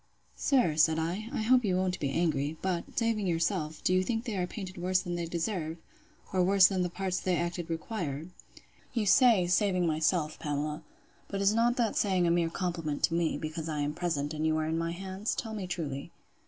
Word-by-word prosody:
Sir, 240 - +2
said 160 0 +4
I, 180 +8 -2
I 225 - -2
hope 250 +2 +4
you 190 -4 +1
won't 185 0 0
be 140 - -1
angry, 150 -1 0
but, 180 -3 -2
saving 225 -4 +1
yourself, 165 -2 -1
do 185 - +2
you 185 - +4
think 225 +4 -2
they 225 -4 -3
are 180 -2 -1
painted 185 -1 -7
worse 185 +1 +2
than 175 -2 -4
they 170 -1 -2
deserve? 165 -1 -2 0.6
or 185 -1 +3
worse 195 +1 +6
than 190 -1 +3
the 180 - 0
parts 185 +1 -2
they 180 -2 0
acted 170 0 -3
require? 165 -4 -3 0.7
You 225 -3 +1
say, 225 -3 +5
saving 180 0 +2
myself, 160 0 +1
Pamela; 150 +1 -2 0.5
but 200 - -4
is 200 +1 +3
not 235 +2 +3
that 235 -4 0
saying 190 -3 +2
a 170 - +3
mere 170 -1 +2
compliment 165 -4 -3
to - - +3
me, 170 -1 +1
because 160 +1 -5
I 150 -2 -2
am 145 +1 -1
present, 150 -3 -2
and 155 0 -3
you 155 0 +2
are 155 - 0
in 160 +1 -1
my 165 0 -1
hands? 190 +4 -3
Tell 225 -3 -4
me 200 -4 -4
truly. 145 -6 -4
175 Hz, 210 wpm, -30 LUFS, 160-195 Hz, 0.7 s, worse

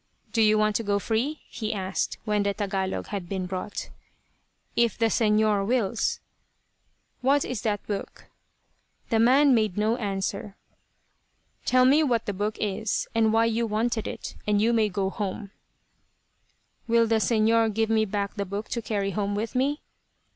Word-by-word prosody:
"Do 225 - +2
you 215 0 +5
want 215 0 +2
to 230 - -4
go 200 -1 +1
free?" 235 +9 -1
he 220 -2 -4
asked, 190 -1 -2
when 210 -2 +1
the 200 0 0
Tagalog 195 -2 -2
had 195 -4 -5
been 190 -2 -2
brought. 185 +3 -5 0.8
"If 235 -3 +2
the 225 -1 +2
Señor 215 -2 +2
wills." 235 0 0 1.0
"What 275 +2 +3
is 250 -5 -4
that 210 -3 -2
book?" 200 -2 -5 0.9
The 225 - +3
man 265 +4 +5
made 215 -5 +1
no 220 +3 +1
answer. 200 -1 -3 1.1
"Tell 255 0 +4
me 280 +4 +5
what 240 -7 +1
the 205 - -2
book 210 +3 -2
is, 210 +1 -1
and 225 -1 +3
why 225 +1 +3
you 230 0 0
wanted 220 +1 -1
it; - - -6
and 210 -1 +3
you 230 +3 +3
may 220 -2 +3
go 195 0 -1
home." 200 0 -4 1.4
"Will 230 0 +4
the 225 0 +2
Señor 225 0 +3
give 225 +1 0
me 220 -1 +3
back 200 -1 -2
the 200 -2 -3
book 200 +3 -5
to 235 - -2
carry 200 -3 -2
home 200 +1 -1
with 220 +2 -3
me?" 275 +4 0
215 Hz, 165 wpm, -26 LUFS, 200-230 Hz, 1.4 s, you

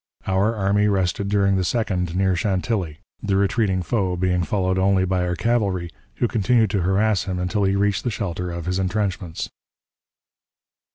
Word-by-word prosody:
Our 95 +4 +1
army 105 0 +2
rested 100 0 0
during 100 -1 +2
the - - +1
2d 90 -4 -1
near 95 0 +2
Chantilly, 95 -3 -1 0.2
the 100 -2 0
retreating 100 -1 +1
foe 95 -4 0
being 90 0 +1
followed 95 +1 0
only 95 0 +3
by 90 -1 0
our 90 - -1
cavalry, 100 -6 0 0.2
who 120 - +1
continued 115 -2 +2
to 100 - 0
harass 100 +3 +1
him 95 -2 -3
until 95 +3 0
he 95 0 +2
reached 100 0 +1
the 125 - 0
shelter 90 -5 -3
of 85 -1 -5
his 90 +1 -1
intrenchments. 95 -3 -2
95 Hz, 165 wpm, -22 LUFS, 90-105 Hz, 0.2 s, only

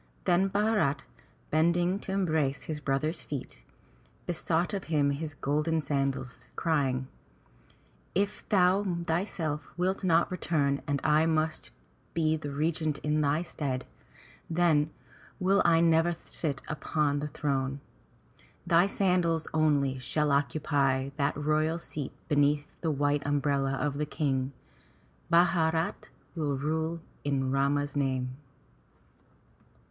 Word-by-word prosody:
Then 190 +1 +3
Bharat, 200 -9 +1 0.5
bending 175 +4 +2
to 195 - -6
embrace 155 -8 0
his 155 -2 -4
brother's 150 +4 -1
feet, 140 - -7 0.6
besought 170 +1 0
of 195 -1 -3
him 145 -3 +2
his 150 +1 -4
golden 150 +4 0
sandals, 135 -3 -3
crying, 135 -6 0 1.1
"If 200 +2 -1
thou 190 0 +4 0.2
thyself 160 -3 -2
wilt 185 +3 0
not 170 -1 +3
return 145 -6 0
and 145 -1 0
I 155 +2 +4
must 160 -1 0 0.5
be 160 -1 +2
the 150 -2 -5
regent 155 +1 -1
in 150 +1 +1
thy 150 +3 +1
stead, 135 -6 -3 0.6
then 160 -3 +3 0.5
will 195 +1 +3
I 165 -1 +4
never 165 +1 +3
sit 140 -5 -3
upon 150 -1 0
thy 150 - -3
throne. 140 -2 -2 0.9
Thy 170 +3 +4
sandals 180 -5 +1
only 145 -4 +2
shall 150 +3 0
occupy 140 -2 +1
that 140 -1 0
royal 155 +2 +1
seat 150 -4 -5 0.2
beneath 145 -1 +2 0.2
the 165 - 0
white 145 0 +1
umbrella 140 -1 +1
of 140 +1 -1
the 150 - -1
King. 135 -3 -1 0.8
Bharat 165 -1 +2 0.2
will 150 -4 -1
rule 160 +3 -1 0.2
in 135 -2 0
Rama's 140 +1 +1
name. 130 -2 -1
150 Hz, 120 wpm, -29 LUFS, 140-165 Hz, 1.1 s, thou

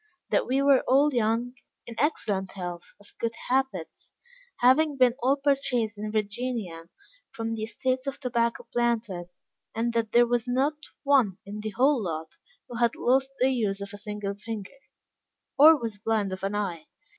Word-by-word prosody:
That - - +2
we 270 +2 +1
were 280 -2 +5
all 280 +3 +4
young, 235 +1 0 0.3
in 235 - -8
excellent 205 -10 -1
health, 175 -2 -7
of 205 - -18
good 230 -1 -1 0.2
habits, 255 -10 -2 0.4
having 280 +4 +4
been 250 -2 +5
all 265 +3 +3
purchased 270 -6 0
in 210 +1 -5
Virginia, 210 -5 -3 0.4
from 225 0 -4
the 225 - -4
estates 255 +4 -2
of 275 +1 -4
tobacco 235 -3 -1
planters; 220 -7 -2 0.3
and 230 +1 -1
that 230 -2 -1
there 240 0 +6
was 240 0 0
not 265 +5 +1 0.3
one 260 -10 +3
in 205 +2 -7
the 215 +1 -4
whole 260 +4 +2
lot 160 -2 -5 0.3
who 240 - -7
had 235 -1 +2
lost 265 +2 +2
the 260 +1 +3
use 210 -6 -1
of 200 +1 -7
a - - -7
single 210 -1 -4
finger, 215 +4 -7 0.8
or 310 +3 +8
was 225 -4 -5
blind 210 -2 0
of 190 - -6
an 195 +1 -1
eye. 180 -6 -3
230 Hz, 170 wpm, -27 LUFS, 205-255 Hz, 0.8 s, or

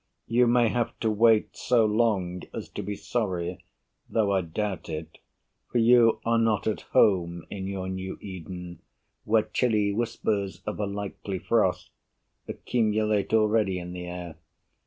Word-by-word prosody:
You 120 +2 +3
may 120 -1 +4
have 120 0 -2
to 110 - +2
wait 110 0 +3
So 120 -3 +3
long 105 -5 +1
as - - -6
to - - -5
be 105 +1 -4
sorry; 90 -7 -3 0.5
though 105 -3 +1
I 95 -1 +2
doubt 90 +1 -4
it, 80 0 -6 0.5
For - - 0
you 115 -1 +5
are 115 0 +3
not 110 -3 +1
at 110 - -1
home 85 -4 +3
in 95 -1 -4
your 95 -1 -4
new 95 0 -5
Eden 90 -2 -8 0.5
Where 110 0 +3
chilly 105 -5 +1
whispers 105 -3 -2
of 105 - -4
a 105 - 0
likely 100 -1 -5
frost - - 0 0.6
Accumulate 110 -3 0
already 110 -3 +3
in 90 0 -6
the 90 -1 -6
air. 90 -2 -7
105 Hz, 150 wpm, -27 LUFS, 90-110 Hz, 0.6 s, you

